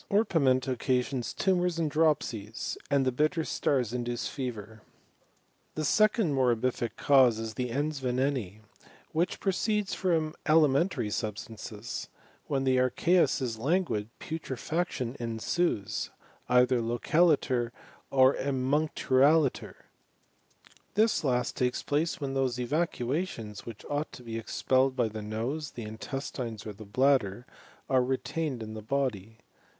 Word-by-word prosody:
Orpiment 145 - +3
occasions 125 0 0
tumours 180 -3 +1
and 160 -3 0
dropsies, 120 -9 0
and 140 -1 +3
the 130 - +2
Intter 155 +6 +1
stars 125 -5 0
induce 120 -1 -2
fever. 110 -5 -6 0.9
The 155 - -1
second 215 - +3
morbiiBc 125 -2 +1
cause 130 -5 +5
is 110 0 -4
the 125 0 -2
ejis 145 +3 -2
veneni, 125 -5 -1 0.5
which 170 +3 0
proceeds 210 +1 0
from 160 -4 0
alimentary 155 - +3
substances: 110 +1 -5 0.4
when 135 -2 0
the 130 -1 +3
ar 130 0 +3
cheus 175 -2 +2
is 115 -3 -3
languid 125 - 0
putrefaction 155 -3 -3
ensues, 115 - -1 0.4
either 125 0 +4
localiter 125 +1 +2 0.4
or 130 0 +5
emuncturaliter. 140 +1 +2 1.2
This 215 -4 +3
last 125 -3 0
takes 125 -1 0
place 150 +3 0
when 140 -2 -3
those 130 -2 0
eva 150 +8 +1
cuations, 120 - -4
which 115 -3 -9
ought 145 +2 -2
to 125 - -10
be 115 -1 -4
expelled 130 +3 +1
by 120 -4 +1
the 110 0 -6
nose, 120 +8 -3
the 120 - -8
intestines, 115 0 -5
or 105 - -5
the 105 +2 -11
bladder, 125 -1 +2 0.4
are 130 -2 +3
retained 130 0 -2
in 110 0 -7
the 110 - -6
body. 110 -4 -2
130 Hz, 125 wpm, -29 LUFS, 115-155 Hz, 1.2 s, cause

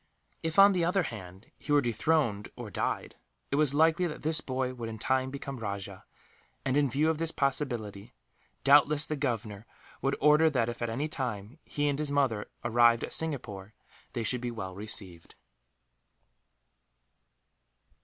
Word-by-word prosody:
If, 160 -1 -3
on 200 +1 +9
the 180 -2 +1
other 180 +2 +2
hand, 95 - -9
he 145 - -6
were 145 - +6
dethroned, 120 -3 0
or - - -8
died, - - -3 0.3
it - - +1
was 145 -1 +3
likely 165 +4 +4
that 155 - -7
this 155 +1 +1
boy 130 -1 -2
would 120 -2 -6
in 110 - -6
time 130 +3 0
become 140 -1 -6
rajah 100 -3 -6 0.6
and, 135 0 +1
in 145 -1 +3
view 150 +5 +2
of 160 - -4
this 165 -1 0
possibility, 120 -8 -2 0.5
doubtless 145 +1 +5
the 155 - -2
Governor 115 -6 -3 0.3
would 135 +1 0
order 150 +2 +5
that 120 -6 0
if, 120 - -6
at 120 - -1
any 135 +7 -2
time, 125 -3 -5
he 145 0 -2
and 145 0 0
his 150 -2 -1
mother 130 -7 +1 0.2
arrived 120 0 +4
at - - -4
Singapore, 110 -10 -3 0.4
they 115 - -2
should 125 +2 0
be 125 - -2
well 110 -6 -6
received. 95 -4 -5
130 Hz, 165 wpm, -29 LUFS, 110-150 Hz, 0.6 s, on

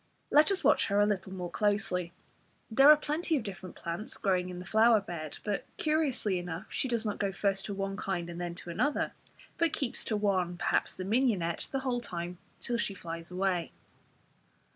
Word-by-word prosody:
Let 300 +1 +6
us 390 - +1
watch - - +4
her 200 0 +2
a 205 - +6
little 195 -2 -1
more 180 -2 -5
closely. 190 -4 0 0.6
There 270 +6 +7
are 305 - +10
plenty 305 +2 0
of 255 - -3
different 190 -3 -7
plants 170 +6 -5
growing 185 -3 +1
in 180 - -6
the 180 - -7
flower 220 +2 +5
bed, 170 -6 -6
but, 205 -2 -1
curiously 285 - +1
enough, 175 -1 -5
she - - -1
does 235 -2 -1
not 210 - -2
go 200 -1 0
first 195 0 0
to 205 - -4
one 195 0 -3
kind 180 -5 -2
and 170 0 -6
then 175 -1 -3
to 175 -1 -8
another; 290 - 0 0.5
but 330 -2 +2
keeps 270 -7 -2
to 215 - 0
one, 185 -4 +1
perhaps - - 0
the 185 - -4
mignonette, 200 -7 +1
the 270 - -1
whole 250 -2 -1
time 175 -4 -5 0.2
till 240 - -1
she 205 -4 -1
flies 165 -2 -6
away. 180 -2 -1
195 Hz, 195 wpm, -31 LUFS, 180-235 Hz, 0.6 s, are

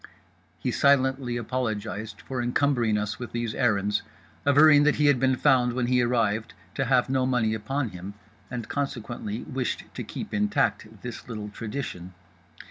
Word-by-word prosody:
He - - -2
silently 130 -3 +2
apologized 110 -3 -3
for 130 -2 -4
encumbering 120 -3 +2
us 105 0 -3
with 120 - -7
these 120 -2 -2
errands, 105 -4 +1 0.5
averring 145 +1 +7
that 150 +1 +4
he 150 - +2
had 145 -3 +5
been 130 0 +3
found 125 -3 +3
when 125 0 0
he 125 0 +3
arrived 115 -2 0 0.2
to 135 - -1
have 125 0 +3
no 130 -1 +1
money 120 -4 +1
upon 125 +4 -2
him 95 +2 -8 0.3
and 120 -3 -5
consequently 120 -5 -4
wished 130 -1 -3
to 125 - -5
keep 210 - -7
intact 135 - 0
this 125 0 -7
little 105 -2 -5
tradition. 105 -5 -6
125 Hz, 155 wpm, -26 LUFS, 110-135 Hz, 0.5 s, averring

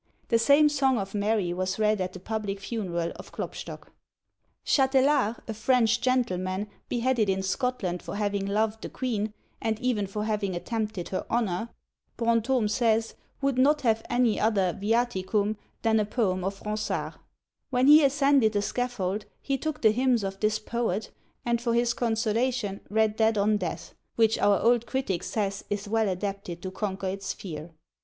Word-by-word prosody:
The 230 - +4
same 285 +6 +6
song 275 -3 +2
of 195 -2 -4
Mary 205 -3 0
was 185 +1 -2
read 215 -2 +2
at 185 0 -3
the 185 - -8
public 205 0 -3
funeral 180 -6 -3
of - - -11
Klopstock. - - -7 0.7
Chatelar, 265 -4 +3
a 220 - -3
French 235 +1 +2
gentleman, 190 -7 0 0.2
beheaded 240 -3 +1
in 190 0 0
Scotland 190 -3 -1
for - - -6
having 200 -1 -1
loved 215 +2 0
the - - -6
queen, 220 -5 -2 0.3
and 220 -1 -1
even 230 -5 0
for 210 +2 -3
having 210 -4 -1
attempted 215 -1 -3
her 190 - -2
honour, 225 -2 0 0.5
Brantome 230 0 +2
says, 225 0 +1 0.3
would 275 -2 +1
not 295 +3 +4
have 225 -3 +2
any 240 -2 +2
other 200 -5 +2
viaticum 210 -1 0 0.3
than 225 -1 +3
a 210 - +1
poem 200 -4 0
of 195 +1 -4
Ronsard. 215 0 -2 0.6
When 250 0 +2
he 300 +2 +8
ascended 275 -5 +4
the 205 0 +1
scaffold 210 -4 -2
he 275 - -1
took 305 +1 -4
the 220 - +7
hymns 245 -1 +2
of 195 0 -4
this 215 0 +2
poet, 220 -2 -2 0.3
and 235 -1 +1
for 235 -1 0
his 240 0 +2
consolation 230 -2 0
read 220 0 +2
that 220 -1 +3
on 210 +1 +3
death, 170 -3 -5 0.2
which 225 -1 +3
our 205 -1 +4
old 235 0 +3
critic 260 -10 -1
says 200 -2 -2
is 205 0 -3
well 220 0 +1
adapted 190 -2 -4
to 185 - -4
conquer 195 -1 -3
its 190 0 -4
fear. 160 -3 -7
215 Hz, 165 wpm, -27 LUFS, 195-240 Hz, 0.7 s, he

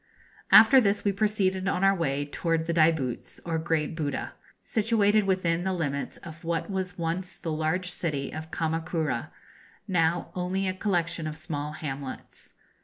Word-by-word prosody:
] - - -25
After 255 +4 +6
this 205 -1 +1
we 200 - +4
proceeded 195 -2 0
on 185 0 0
our 195 0 +6
way 145 -6 -1
towards 165 +2 -1
the 170 - -1
Daibutz, 155 -6 +1
or 165 -1 -1
Great 160 -1 -1
Buddha, 150 -3 -3 0.3
situated 215 -2 +2
within 175 -3 +1
the 190 0 0
limits 140 -5 -2
of 165 0 -11
what 170 +4 -2
was 185 -2 -3
once 175 +2 -3
the 165 - -4
large 160 +4 -1
city 145 -6 -3
of 155 +1 -6
Kama 160 0 -1
kura, 160 -7 -2 0.6
now 170 -3 +1
only 185 +2 -1
a 185 - 0
collection 170 -4 -1
of 155 0 -5
small 150 -1 -4
hamlets. 135 -3 -7
170 Hz, 165 wpm, -27 LUFS, 155-190 Hz, 0.6 s, After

